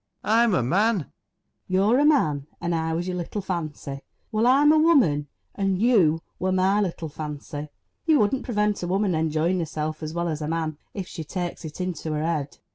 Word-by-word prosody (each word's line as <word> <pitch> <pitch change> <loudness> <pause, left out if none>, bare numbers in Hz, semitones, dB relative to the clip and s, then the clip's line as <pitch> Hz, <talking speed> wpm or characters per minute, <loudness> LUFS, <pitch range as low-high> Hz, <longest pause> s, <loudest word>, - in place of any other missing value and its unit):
I'm 225 -1 +3
a 130 - +2
man. 205 - +2
FANNY. - - -12 0.6
You're 200 +7 +3
a 290 - +4
man, 150 - +2
and 175 0 -1
I 160 0 -1
was 170 +2 -2
your 180 -1 -2
little 175 +4 -4
fancy. 155 -6 -4 0.3
Well, 220 +2 +2
I'm 285 +4 +6
a 310 - +5
woman, 245 - +4 0.3
and 195 -2 0
you 185 -9 +3 0.2
were 185 +1 0
my 190 +2 +3
little 170 -4 -2
fancy. 150 0 -6 0.4
You 315 -2 +5
wouldn't 220 +5 +1
prevent 210 -3 0
a 175 - -3
woman 195 +1 +1
enjoying 160 +3 +1
herself 155 -1 -3
as 155 +1 -5
well 170 0 -1
as 155 -2 -3
a 150 - -2
man, 160 -2 -2 0.2
if 190 -3 -4
she 165 - -6
takes 175 +2 -5
it 155 +2 -8
into 170 -4 -3
her 150 0 -1
head 155 -4 -2
175 Hz, 200 wpm, -25 LUFS, 155-210 Hz, 0.6 s, I'm